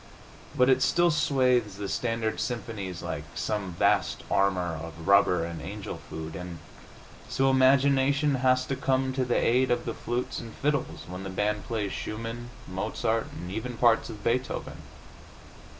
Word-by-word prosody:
But 125 - +4
it 130 0 +4
still 175 +3 +4
swathes 125 -8 +2
the 100 -1 -4
standard 115 0 -1
symphonies 105 -7 -4
like - - -4
some 105 -4 -2
vast - - +1
armor 90 -4 +2
of 80 0 -8
rubber 90 -4 +5
and 85 -1 -6
angel - - -6
food, 80 0 -6
and 90 0 -6 0.7
so 135 0 +2
imagination 140 +2 +4
has 130 0 +3
to 135 - -2
come 130 0 0
to 130 0 0
the 125 -1 +1
aid 130 +2 +3
of 120 0 +1
the - - -2
flutes 120 +2 -3
and 115 -2 -9
fiddles 140 -2 -1
when 90 +2 -6
the 95 - -5
band 105 +2 -1
plays 105 -4 -2
Schumann, 115 +2 -5 0.2
Mozart, 110 +4 -1
and 90 +1 -7
even 115 +4 -4
parts 115 -1 +3
of 105 -2 -9
Beethoven. 125 +3 -1
115 Hz, 155 wpm, -28 LUFS, 95-130 Hz, 0.7 s, rubber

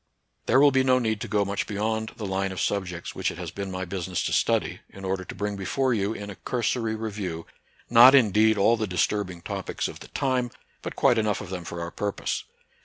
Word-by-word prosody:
There 130 - +5
will 145 0 +7
be 130 0 +3
no 130 -1 +4
need 110 -4 -1
to - - -3
go 105 -1 +1
much 100 +1 -2
beyond 110 +2 -2
the 110 - -5
line 95 0 -1
of 95 - -5
subjects 90 -1 -2
which - - -1
it - - -7
has - - -5
been 100 -1 -5
my 95 0 -4
busi 90 0 -4
ness 90 -2 -1
to - - -1
study, - - +1
in 95 0 -10
order 95 0 -1
to - - -9
bring 105 0 -2
before 125 +7 0
you, 100 -2 0
in 105 -2 -6
a - - -9
cursory 115 -2 -1
review, 100 -7 -4 0.4
not 120 +3 +9
indeed 110 -3 +4
all 115 +4 +4
the 110 -1 -1
disturbing 90 -1 -1
topics - - -3
of - - -9
the - - -11
time, 130 -3 0 0.3
but - - -6
quite 120 - +4
enough 105 -2 0
of 95 - -8
them 90 -2 -4
for 85 - -5
our 85 0 -4
purpose. 100 +2 -3
105 Hz, 230 wpm, -26 LUFS, 95-115 Hz, 0.4 s, not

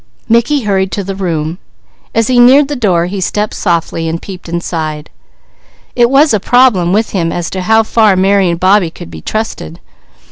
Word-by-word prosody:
Mickey 235 +5 +2
hurried 190 -2 0
to 200 - -3
the 195 +1 -5
room. 170 -3 -3 0.6
As 225 - +2
he 250 +1 +2
neared 270 +4 +5
the 290 - -3
door 185 -9 +1
he 190 +2 -5
stepped 210 +3 -2
softly 165 -2 -2
and 165 +1 -3
peeped 180 -2 -10
inside. 160 -3 -4 0.8
It 240 -1 +3
was 280 +1 +3
a 215 - +2
problem 215 -6 +3
with 215 +3 0
him 170 -4 -1
as 170 -1 -4
to 190 - -4
how 220 +4 +3
far 215 -3 +2
Mary 190 0 +2
and 170 0 -2
Bobbie 185 -1 +3
could 85 - -12
be 80 -1 -10
trusted. 215 - -5
195 Hz, 185 wpm, -12 LUFS, 170-225 Hz, 0.8 s, neared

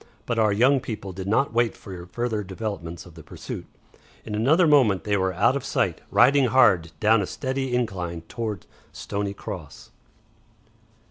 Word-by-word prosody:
But 115 -1 -1
our 110 -1 +3
young 130 +7 +4
people 105 -6 -6
did 95 +1 -6
not 115 +5 +1
wait 120 0 +1
for 90 -3 -9
further 115 +1 -2
developments 95 -4 -6
of 90 - -14
the 80 - -12
pursuit. 75 - -8 0.6
In 110 - -6
another 140 +12 +3
moment 130 - +4
they 105 -1 0
were 95 -1 +1
out 100 +8 +2
of 140 - -3
sight, - - -1
riding 135 +2 +5
hard 95 -10 +4
down 110 0 +4
a 95 - -3
steady 130 -2 -3
incline 90 -8 -2
towards 105 +1 -5 0.3
Stoney 100 0 -4
Cross. 85 -7 -9
105 Hz, 160 wpm, -24 LUFS, 95-125 Hz, 0.6 s, riding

